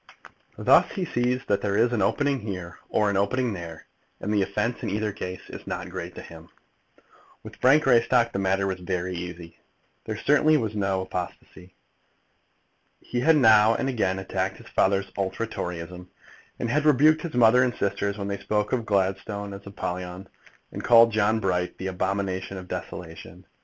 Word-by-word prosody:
Thus - - +4
he 190 -4 -2
sees 125 -2 -1
that 100 -1 +1
there 100 -1 0
is 120 +2 +3
an 115 - 0
opening 140 +7 +1
here 90 -5 -7
or 105 -1 +2
an 100 - 0
opening 115 +4 0
there, 85 -3 -8 0.3
and 105 - -2
the 105 - +2
offence 105 +5 -1
in - - -3
either 105 +1 -1
case 90 -2 -7
is - - -10
not - - -5
great - - -6
to - - -8
him. 80 0 -13 0.9
With - - -11
Frank 140 +4 +5
Greystock 120 -2 +3
the - - -1
matter 95 0 +1
was 95 -1 -2
very 90 0 -3
easy. 85 -1 -8 0.5
There 110 -1 -4
certainly 150 +5 +4
was 110 -6 -2
no 95 -2 0
apostasy. 90 0 -7 1.2
He 120 - -4
had 160 +6 +4
now 110 -3 +6
and - - -1
again 110 -8 0
attacked 95 0 -3
his - - -14
father's 100 0 +1
ultra 100 +3 -2
Toryism, 90 -3 -6 0.5
and 120 - -2
rebuked 155 +1 +5
his 165 -5 -6
mother 120 +1 +6
and 125 -1 +1
sisters 100 +1 -1
when 100 -1 -4
they 100 0 -3
spoke 105 +1 -1
of 120 -3 -1
Gladstone 100 +1 -1
as 100 +1 -10
Apollyon, 90 -1 -5 0.4
and - - -6
called 115 -1 +7
John 110 +1 +2
Bright 90 -3 -1
the 95 - -6
Abomination 95 0 -2
of 90 -1 -8
Desolation. 80 -2 -8
100 Hz, 175 wpm, -25 LUFS, 95-115 Hz, 1.2 s, called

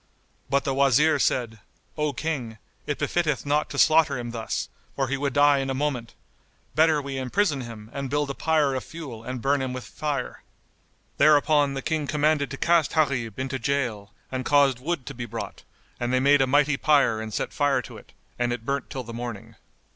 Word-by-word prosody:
But 140 +1 +2
the 135 - -1
Wazir 140 +3 +4
said, 115 -4 0 0.4
"O 150 -1 0
King, 130 -6 -4 0.3
it 145 - -1
befitteth 155 -6 0
not 145 +1 +1
to - - -6
slaughter 155 -3 +4
him 120 -1 -5
thus, 115 -1 -3 0.3
for 135 -2 -1
he 140 - 0
would 140 -1 -2
die 145 -1 +5
in 135 0 -2
a 135 - -1
moment: 130 -5 -2 0.6
better 155 +1 +4
we 140 -1 -4
imprison 140 +3 0
him 115 -3 -9
and 140 -1 -4
build 145 0 0
a - - -4
pyre 155 -2 +1
of 130 - -3
fuel 140 -9 -9
and 125 0 -5
burn 140 0 +2
him 130 -1 -3
with 130 -1 -5
fire." 150 -2 -4 0.8
Thereupon 145 -2 +4
the 135 - -4
King 155 -3 -1
commanded 150 -1 +1
to 135 - -6
cast 170 -3 +2
Gharib 130 -9 0
into 130 0 -3
gaol 115 -5 -2 0.2
and 130 -1 -2
caused 140 -2 +3
wood 145 -1 -3
to 140 - -6
be 120 -1 -5
brought, 115 +1 -6 0.4
and 120 0 -1
they 130 - +3
made 140 +1 +5
a 135 - +3
mighty 145 +1 +3
pyre 140 -8 +3
and 110 0 -6
set - - -3
fire - - +1
to - - -10
it, - - -16 0.3
and 120 0 +1
it 120 -2 -4
burnt 140 -1 -2
till 130 - -5
the 115 0 -9
morning. 115 -2 -6
135 Hz, 200 wpm, -25 LUFS, 125-145 Hz, 0.8 s, die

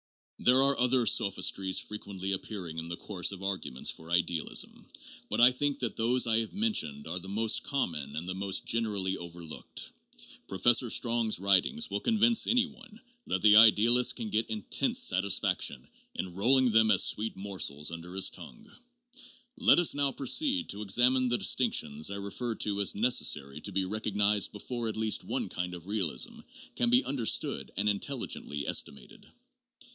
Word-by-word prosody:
There 130 +2 +4
are 140 0 +4
other 125 0 +2
sophistries 95 -2 +1
frequently 100 -2 -4
appearing 95 -4 -5
in 80 - -7
the 85 0 -6
course 95 -3 -3
of 95 -1 -9
arguments 95 -10 -2
for 80 0 -12
idealism, 85 -1 0 0.4
but - - -2
I 120 +2 +8
think 145 +2 -1
that 120 - -3
those 120 +3 +2
I 115 -1 +2
have 115 - -5
mentioned 200 - -1
are 85 +3 -4
the 95 +1 -11
most 110 +2 +1
common 75 - -3
and 80 +3 -5
the 90 - -3
most 95 0 -1
generally 105 -5 -1
overlooked. 85 -2 -7 0.6
Pro 95 - -6
fessor 120 +3 +3
Strong's 115 -1 +1
writings 100 - +1
will - - -1
convince 230 0 +2
any 245 +1 +3
one 220 -1 -15 0.3
that - - -2
the 105 -1 +7
idealist 115 +3 +5
can 110 -4 -6
get 110 +1 -1
intense 110 - -1
satisfaction 100 - +1 0.3
in 90 -1 -5
rolling 125 +6 +2
them 110 0 +4
as - - +4
sweet 110 +1 -1
morsels 90 -7 -3
under 85 +2 -8
his 95 -1 +2
tongue. 220 0 -12 0.9
Let 250 -1 +5
us 175 -2 +3
now 140 -1 0
proceed 270 - 0
to 105 - -3
examine 125 +5 +3
the 120 0 +1
distinctions 75 -6 +1
I 100 - -5
referred 105 +4 -5
to 100 -1 0
as 100 - +2
necessary 75 - 0
to 100 - -3
be 95 0 -1
recognized 105 0 +1
before 115 +3 -5
at 110 - -4
least 110 -1 0
one - - -3
kind 90 0 -4
of 85 -1 -11
realism 105 - -1 0.4
can 240 - +1
be 250 +2 +3
understood 130 -5 -1
and 100 +2 0
intelligently 100 - -3
estimated. 70 - -2
105 Hz, 165 wpm, -29 LUFS, 95-125 Hz, 0.9 s, I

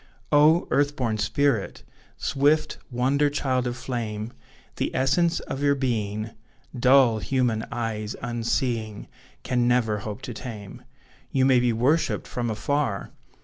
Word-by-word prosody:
Oh! 155 +3 +5
earth 145 +1 +2
born 115 -5 -1
spirit! 115 +1 0 0.3
Swift 150 +3 +1
wonder 135 +4 +2
child 130 -3 -1
of 120 0 -4
flame; 115 -3 -4 0.4
The - - 0
essence 165 +6 +2
of 135 - -6
your 140 0 +3
being, 110 -5 -2 0.4
Dull 125 -2 +5
human 120 -2 0
eyes, 110 -2 -3
unseeing, 115 -2 -2 0.4
Can 125 -1 +1
never 115 -4 +2
hope 110 +3 -7
to 125 - -5
tame; 110 -1 -8 0.5
You 130 -1 +2
may 130 -2 +5
be 120 -1 +2
worshipped 130 +8 +1
from 120 -2 -3
afar! 110 -1 -1
125 Hz, 130 wpm, -25 LUFS, 110-140 Hz, 0.5 s, Oh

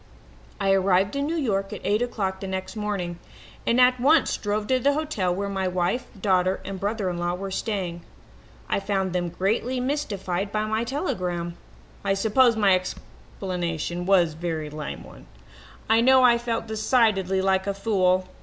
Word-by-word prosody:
"I 195 -1 +2
arrived 195 +3 +2
in 280 +1 -1
New 330 - -1
York 195 -9 -1
at - - -6
eight 210 +3 +1
o'clock 195 -6 -2
the 195 - -5
next 190 +1 -4
morning 195 -5 -3 0.5
and 235 +2 +3
at 250 0 +5
once 290 +4 +4
drove 210 0 -2
to 255 +3 +2
the 280 +3 +3
hotel 290 - -1
where 200 +3 -2
my 190 -1 -1
wife, 180 +7 -1
daughter 185 -1 +2
and 195 0 -5
brother 205 0 -1
in 175 -1 -2
law 175 0 -1
were 195 +1 -5
staying. 185 -4 -3 0.7
I - - 0
found 195 -2 -1
them 175 -1 -1
greatly 220 +8 -1
mystified 205 -9 -2
by 215 0 0
my 220 +2 -1
telegram. 180 - -2 0.5
I 195 -1 +1
suppose 230 +4 +4
my 205 -3 +4
explanation 175 -2 -4
was 175 -5 +4
a - - -14
very 160 -3 -3
lame 150 0 -6
one. - - -14 0.6
I 225 +1 +4
know 260 +1 +6
I 240 -1 +5
felt 235 -1 -2
decidedly 215 -4 +2
like 190 0 +1
a 200 - 0
fool. 185 -3 +1
195 Hz, 175 wpm, -25 LUFS, 185-230 Hz, 0.7 s, know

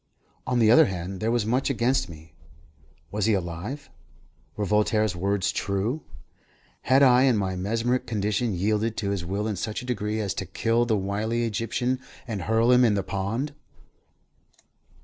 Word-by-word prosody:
On 125 0 +1
the 110 -2 +5
other 120 - +7
hand, 95 0 -5
there 110 - -1
was 120 -2 +1
much 125 +6 +1
against 125 -1 +1
me. 80 0 -13 0.8
Was 105 -1 -1
he 110 - +3
alive? 95 - -5 0.6
Were 105 - -2
Voltaire's 105 -1 +1
words 100 +2 0
true? 100 +9 -2 0.8
Had 135 +2 +4
I 130 0 +6
in 125 -4 +3
my 95 -2 -1
mesmeric 115 +7 -1
condition 105 0 -1
yielded 105 +4 0
to 100 -2 -1
his 100 -3 -2
will 100 +4 -2
in 105 -3 -2
such 110 +6 -4
a - - -8
degree 110 -3 -2
as 100 -4 -1
to 95 - -5
kill 115 +5 +1
the 110 -3 +1
wily 105 +4 -1
Egyptian 120 +3 -1 0.3
and 110 -5 -3
hurl 115 +5 +2
him 125 0 +6
in 110 -4 +4
the 100 - -1
pond? 110 +11 -3
110 Hz, 170 wpm, -25 LUFS, 100-120 Hz, 0.8 s, other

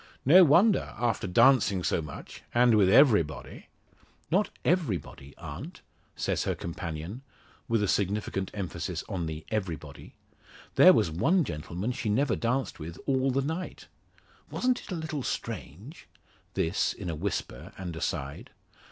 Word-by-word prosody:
No 180 +8 +8
wonder, 180 +7 +4
after 115 -5 -1
dancing 105 -2 +4
so 85 - +1
much, 75 -2 -9
and 120 0 +5
with 100 -3 +4
everybody." 105 - +3 0.6
"Not 195 +5 +2 0.2
everybody, 105 - -1
aunt!" 75 -4 -8 0.3
says - - -1
her - - 0
companion, 85 - -6 0.5
with 115 -4 +1
a - - +1
significant 100 0 -1
emphasis 90 -3 -4
on 90 -5 -3
the 80 0 -6
everybody. 95 -8 -5 0.6
"There - - +8
was 80 - +2
one 165 - +2
gentleman 85 - -4
she 115 -3 -3
never 120 +3 +2
danced 125 -1 -1
with 85 +2 -7
all 135 -1 +1
the 135 +1 0
night. 160 +6 -5 0.6
Wasn't 250 0 0
it - - -11
a - - -1
little 160 -3 -4
strange?" 115 - -6 0.5
This 85 +5 0
in 100 - -8
a 85 - -2
whisper 75 -8 -4
and 90 -4 -6
aside. 75 -4 -4
105 Hz, 140 wpm, -28 LUFS, 85-135 Hz, 0.6 s, No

